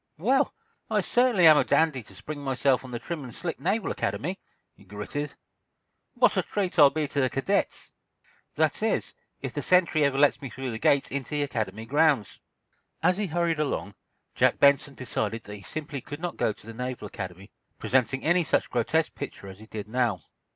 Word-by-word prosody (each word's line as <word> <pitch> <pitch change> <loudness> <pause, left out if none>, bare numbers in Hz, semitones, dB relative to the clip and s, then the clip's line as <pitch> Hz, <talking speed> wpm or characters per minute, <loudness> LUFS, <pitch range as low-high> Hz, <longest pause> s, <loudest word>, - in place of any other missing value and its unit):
"Well, 265 - +2 0.3
I - - +2
certainly 240 -8 +3
am 155 -2 +9
a - - +4
dandy 155 -5 +2
to 110 - -16
spring 150 -1 -7
myself 135 -1 +1
on 130 - -9
the 120 - -4
trim 160 +4 -5
and 125 - -9
slick 170 -2 -4
Naval 200 +5 0
Academy!" 145 - -2 0.3
he - - -20
gritted. 105 +9 -5 0.8
"What - - +3
a - - +4
treat 190 -4 -2
I'll 145 -2 +9
be 155 0 -2
to 140 - -1
the 130 - +2
cadets! 165 +11 -1 0.6
That - - +1
is, - - 0 0.3
if - - -5
the - - -2
sentry 175 -4 +3
ever 140 -1 +2
lets 145 0 +4
me 135 - -6
through 130 +1 -5
the 110 - -5
gate 140 +3 +2
into 140 +2 -3
the 145 - +1
Academy 110 -5 -3
grounds." 145 - +2 0.6
As 180 - +3
he 210 -1 -1
hurried 170 -1 0
along, 100 - -2 0.4
Jack - - +3
Benson 140 0 +4
decided 115 -3 -3
that 105 - -8
he - - -13
simply 145 +4 -6
could 145 +3 -8
not 175 0 -4
go - - +1
to 105 - -13
the 115 - -8
Naval 125 -1 -5
Academy 95 -1 -8 0.3
presenting 130 +1 +1
any 175 +2 +3
such 150 - 0
grotesque 155 +7 +1
picture 135 -8 -7
as 95 +1 -11
he 110 - -13
did 105 -2 -6
now. 110 - 0
140 Hz, 195 wpm, -27 LUFS, 115-160 Hz, 0.8 s, am